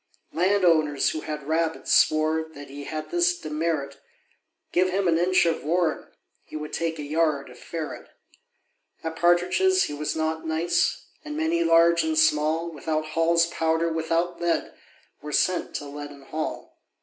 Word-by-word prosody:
Land 185 +3 +2
owners, 155 -4 +3
who 155 - -4
had 150 -2 -6
rabbits, 160 0 0
swore 155 +1 +3
That 145 0 -10
he 145 0 -8
had 155 0 -6
this 175 0 +2
demerit 150 -3 -3 0.7
Give 185 +1 +2
him 190 0 0
an 165 -1 +3
inch 185 +1 +3
of 165 -1 0
warren, 165 +1 0 0.4
he - - -12
Would 150 0 -6
take 165 -1 -2
a 150 - -5
yard 150 -3 0
of 125 - -15
ferret. 160 -3 -6 0.9
At 160 0 -4
partridges 180 - +3
he - - -3
was 150 +1 -3
not 160 0 -2
nice; 160 +2 0 0.2
And 300 0 -6
many, 330 +2 +1
large 170 - +5
and 160 0 -1
small, 155 +2 +2
Without 155 0 -3
Hall's 165 +1 +3
powder, 165 0 0
without 165 +2 -1
lead, 170 -1 0 0.5
Were 150 - -7
sent 180 +4 0
to 145 - -4
Leaden 145 -1 -9
Hall. 155 +3 -5
160 Hz, 160 wpm, -25 LUFS, 155-170 Hz, 0.9 s, large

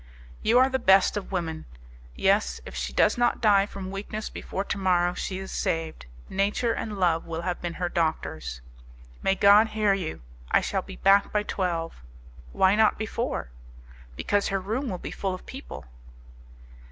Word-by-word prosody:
"You 225 +3 +3
are 260 +1 +6
the 265 0 -1
best 195 -4 +5
of 205 -2 -5
women. 165 -4 -3 0.5
Yes, - - +2
if - - -9
she 60 0 -3
does 65 - +3
not 240 0 +2
die 200 -2 +4
from 190 -2 -7
weakness 210 +2 -5
before 195 - -4
to 200 - -3
morrow, 180 -2 +2
she 185 +1 -4
is 190 0 -7
saved; 165 - -2 0.2
nature 205 +4 0
and 210 -2 -4
love 170 -3 +1
will 165 0 -4
have 180 -1 -3
been 175 -1 -4
her 180 - -2
doctors." 80 - -2 0.6
"May 195 - +2
God 205 +3 +6
hear 215 -2 +1
you! 175 - -4 0.3
I - - +4
shall - - -1
be - - -10
back 200 +1 +4
by 210 0 +1
twelve." 170 - -3 0.5
"Why 190 - +4
not 220 0 +4
before?" 220 - -3 0.6
"Because 205 - 0
her 195 - 0
room 225 +8 -3
will 185 - -3
be - - -7
full 190 -2 -2
of 185 - -13
people." 265 - -9
195 Hz, 175 wpm, -26 LUFS, 170-210 Hz, 0.6 s, are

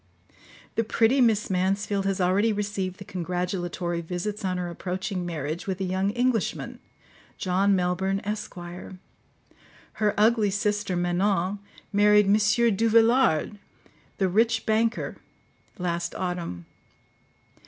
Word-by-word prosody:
The 225 - +1
pretty 230 +4 +3
Miss 220 -4 +2
Mansfield 195 +2 0
has 195 -1 -1
already 190 +5 +3
received 200 -3 -3
the 195 - -10
congratulatory 175 -1 -3
visits 180 +5 -4
on 185 -1 -1
her 180 -1 -3
approaching 180 +1 -4
marriage 160 +1 -4
with 190 -1 -2
a - - -1
young 190 +1 0
Englishman, 240 -1 -1 0.6
John 195 +2 +2
Melbourne, 190 +2 0
Esq. 210 0 -4
Her 180 +3 -7
ugly 215 0 +4
sister, 205 -1 -1
Manon, 180 +2 0 0.3
married 210 0 +5
M. 200 - +4
Duvillard, 225 -2 +3 0.6
the 190 - +2
rich 225 +4 +2
banker, 225 +1 0 0.6
last 175 -2 -2
autumn. 175 - -4
195 Hz, 110 wpm, -26 LUFS, 180-210 Hz, 0.6 s, married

